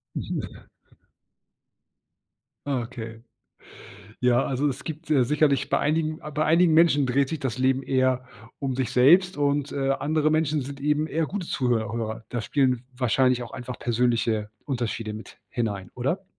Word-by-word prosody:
Mhm. - - -5 2.0
Ah, 135 -3 0
okay. 115 -1 -8 1.0
Ja, 125 +1 +3
also, 135 +2 0
es 130 0 -4
gibt, 160 0 -7
äh, 135 -5 +4
sicherlich 145 0 +2
bei - - +2
einigen 155 +1 0
bei 155 +1 0
einigen 165 +2 +4
Menschen 160 -3 +5
dreht 135 +2 +1
sich 160 - -3
das 130 -3 -3
Leben 130 +1 +2
eher 130 -1 +1 0.3
um 135 -2 -2
sich 130 -1 -2
selbst 175 +9 +5
und, 145 0 0
äh, 135 -1 0
andere 155 +2 +1
Menschen 155 -2 +1
sind 140 +1 -8
eben 150 +2 +1
eher 160 0 -1
gute 190 -4 -4
Zuhör 115 -5 0
Hörer. 115 -1 -4
Da 120 - -2
spielen 130 -1 +1
wahrscheinlich 125 0 +2
auch 120 - -9
einfach 125 0 -7
persönliche 115 -3 0
Unterschiede 115 -5 -3
mit 110 +1 -10
hinein, 100 -6 -3
oder? 140 +11 -2
130 Hz, 155 wpm, -25 LUFS, 120-150 Hz, 2.0 s, Menschen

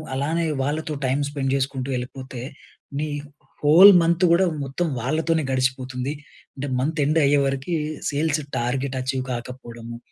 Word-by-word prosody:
అలానే, 160 +5 0 0.2
వాళ్ళతో 150 +2 -2
time 140 +3 +1
spend 135 -2 -2
చేసుకుంటూ 135 -1 -2
ఎళ్ళిపోతే, 130 0 -7 0.6
నీ 155 0 -2 0.5
హోల్ 180 +7 +9
మంత్ 170 +2 +3
కూడా 185 +1 +4 0.2
మొత్తం 140 +6 -2
వాళ్ళతోనే 160 +4 0
గడిచిపోతుంది. 130 +1 -1 0.4
అంటే 140 +1 -4
month 155 +2 -1
end 155 +2 +3
అయ్యేవరకి, 140 +3 +1 0.4
sales 155 +1 0 0.2
target 130 +2 -2
achieve 130 0 -2
కాకపోవడము, 120 -1 -8
140 Hz, 125 wpm, -23 LUFS, 130-155 Hz, 0.6 s, హోల్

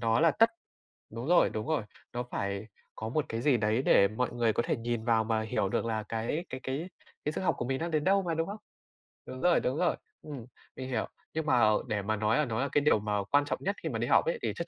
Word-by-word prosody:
nó 115 +1 +2
là 165 -1 +6
tất 225 +9 +4 0.6
đúng 115 +2 -6
rồi, 175 0 +5
đúng 110 +4 -4
rồi, 155 -7 0 0.3
nó 120 0 -2
phải 100 -3 -4 0.3
có 110 - -5
một 150 +4 0
cái 115 +1 -3
gì 130 -3 +4
đấy 110 +3 +1
để 100 -6 +5
mọi 115 +5 -1
người 115 -3 +1
có 120 - +1
thể - - 0
nhìn 115 0 -3
vào 115 -2 +3
mà 110 0 0
hiểu 105 -3 -1
được 115 - 0
là 110 -2 -1
cái 115 +11 -3
cái 130 - -5
cái 140 +7 -3 0.4
cái 150 - +1
sức - - -4
học 165 -6 +1
của 120 - -2
mình 130 +1 -1
đang 170 0 -3
đến 155 -1 +1
đâu 195 +1 +4
mà, 170 - -1
đúng 165 0 -1
không? 205 +2 -5 0.7
Đúng 130 - -8
rồi, 175 -1 +4
đúng 130 +4 -1
rồi, 175 -1 +2 0.3
ừm, 140 -6 -8 0.3
mình 130 0 -6
hiểu, 120 -4 -1 0.3
nhưng 160 0 -2
mà, 125 -4 +3
ờ, 110 -1 +4
để 105 -1 -1
mà 110 +2 -1
nói 110 +2 +1
là 150 - +2
nó 115 -1 -2
là 140 - 0
cái 145 - +3
điều 145 -7 +4
mà 105 -1 -1
quan 145 +8 +2
trọng - - -2
nhất 200 +2 0
khi - - -1
mà - - -3
đi - - -1
học - - +4
ấy - - -1
thì - - -1
chắc - - -4
125 Hz, 280 wpm, -30 LUFS, 110-155 Hz, 0.7 s, là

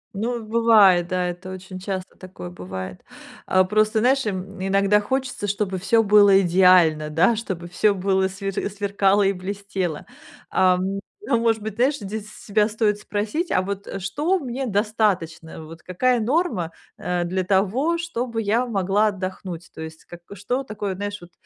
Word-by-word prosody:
Ну 230 +3 -2
бывает, 215 -6 +5
да, 180 0 -1
это 180 +1 -7
очень 185 0 -8
часто 185 -1 -5
такое 180 - -10
бывает. 95 +1 -7 0.4
А 185 0 +4
просто, 215 +3 +1
знаешь, 265 +4 +3
м, 195 -1 -5
иногда 195 +1 +3
хочется, 255 -1 -2
чтобы 195 -1 -2
всё 225 +5 +3
было 205 -2 +6
идеально, 175 -4 +4
да, 170 +9 +3
чтобы 190 -6 -5
всё 200 +4 +2
было 190 0 +1
свер 195 +1 -5 0.2
сверкало 200 0 +1
и 195 0 +2
блестело. 190 -3 -4 0.5
А, 185 -1 +4
м, 190 +2 -2 0.2
ну, 235 - +1
может 225 -2 +1
быть, 215 -1 -5
знаешь, 260 +5 +2
здесь 210 -1 -6
с - - -14
себя 210 0 +2
стоит 210 -1 0
спросить: 215 - -3
"А 185 - +2
вот, 200 +1 -5
э, - - -5
что 295 - 0
мне 265 -4 -4
достаточно? 195 -7 -1
Вот 165 +2 -12
какая 245 +7 +1
норма, 235 - 0 0.3
э, 180 -1 -1
для 185 +2 -1
того, 210 - +1
чтобы 250 -9 -3
я 230 +5 +1
могла 200 -1 +1
отдохнуть?" 185 -3 -5
То - - -9
есть 160 0 -9
как, 175 - -11
э, 200 - -9
что 245 +8 -2
такое, 210 -5 -4
знаешь, 205 +2 -4
вот 175 0 -14
200 Hz, 170 wpm, -23 LUFS, 185-220 Hz, 0.5 s, было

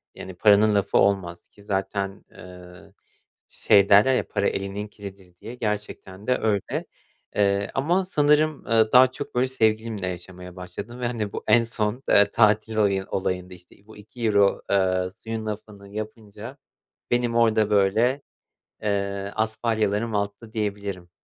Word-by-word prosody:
yani 95 - -9
paranın 105 +2 +4
lafı 100 - +1
olmaz 95 -3 0
ki 100 - -20
zaten, 100 0 -3
eee, 90 -1 -14 0.6
şey 100 -1 +3
derler, 105 +6 +6
"Ya, - - -1
para 100 - 0
elinin 100 +2 -4
kiridir." 95 -3 -12
diye, 115 +4 -8
gerçekten 105 -2 -5
de 125 - +2
öyle. 105 -3 -1 0.5
Eee, 100 0 +1
ama 175 +8 +1
sanırım, 150 -2 +2
ııı, 110 -2 +2
daha 130 0 +7
çok 140 0 -8
böyle, 125 +1 +2
sevgilimle 110 -5 0
yaşamaya 90 0 -8
başladım 100 +7 -8
ve 120 - -1
hani 110 -4 -4
bu - - -5
en 120 - +5
son, 115 +2 -3
eee, 100 0 +5
tatil 110 0 +2
olayı 100 -3 +1
olayında, 90 -1 -3
işte, 90 -1 -16
bu 110 - -14
€2, 105 -2 +1
eee, 95 -2 +1
suyun 110 -1 -6
lafını 105 -2 -7
yapınca 110 +3 -8 0.5
benim 120 -1 +1
orada 110 -2 +3
böyle, 110 +7 +2 0.6
eee, 100 -1 -2
asfalyalarım 110 0 -1
alttı 100 +2 -3
diyebilirim. 100 -4 -4
105 Hz, 140 wpm, -24 LUFS, 100-115 Hz, 0.6 s, daha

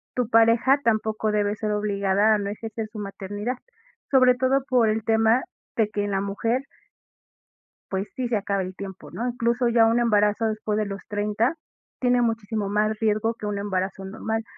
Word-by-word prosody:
tu 245 -3 0
pareja 230 +4 +5
tampoco 220 -1 +1
debe 205 0 +1
ser 215 0 -2
obligada 205 0 +2
a - - +1
no 200 -1 -3
ejercer 220 +1 -5
su 215 - -8
maternidad, 205 +4 -4 0.5
sobre 255 -2 +6
todo 260 +1 +1
por 245 -4 +4
el 220 0 -1
tema 225 +2 +3 0.3
de 220 -2 +2
que 205 -1 -2
en 205 - -3
la 195 0 0
mujer 225 +6 -1 1.3
pues, 195 +1 -2
sí 255 -3 -2
se 235 - 0
acaba 200 -1 -1
el 185 0 -7
tiempo, 190 -1 -9
¿no? 240 - -3
Incluso 240 0 0
ya 230 -1 +5
un 230 +1 +3
embarazo 210 -1 +2
después 215 -1 -2
de 215 - 0
los 195 -1 -6
30, 210 +6 0 0.4
tiene 245 -1 +3
muchísimo 225 -3 -1
más 210 +1 +1
riesgo 220 +1 +1
que 215 - -8
un 205 -1 -2
embarazo 195 -1 -2
normal. 220 +3 -3
215 Hz, 180 wpm, -24 LUFS, 205-230 Hz, 1.3 s, sobre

